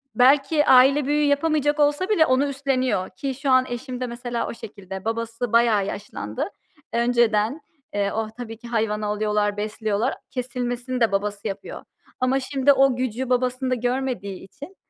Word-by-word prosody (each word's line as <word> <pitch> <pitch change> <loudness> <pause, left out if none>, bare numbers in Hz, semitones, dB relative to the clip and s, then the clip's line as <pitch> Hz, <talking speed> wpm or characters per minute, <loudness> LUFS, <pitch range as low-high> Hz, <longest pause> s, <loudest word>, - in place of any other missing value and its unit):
belki 275 +4 +4
aile 265 +2 +6
büyüğü 295 +2 +2
yapamayacak 295 0 +1
olsa 295 +6 +2
bile 340 -7 +4
onu 260 +1 +2
üstleniyor 260 -8 -1
ki 270 +8 -4
şu 275 +1 -3
an 255 0 +5
eşim 245 +1 -5
de 250 - -1
mesela 240 0 -4
o - - -5
şekilde. 190 -4 -9
Babası 230 +1 -3
bayağı 230 -4 +4
yaşlandı 195 - -5 0.4
önceden. 235 +2 +2 0.3
Eee, 200 -1 0
oh, 220 -1 -2
tabii 225 -2 -7
ki 240 - -12
hayvanı 215 -2 -1
alıyorlar, 210 0 0
besliyorlar, 215 +3 -1 0.2
kesilmesini 250 0 -3
de 230 - +3
babası 205 +1 -2
yapıyor. 195 - -6 0.4
Ama 255 +1 +2
şimdi 270 +1 +3
o 270 -1 +4
gücü 255 0 -3
babasında 255 +1 0
görmediği 245 -6 -3
için, 285 - -12
245 Hz, 155 wpm, -23 LUFS, 215-270 Hz, 0.4 s, aile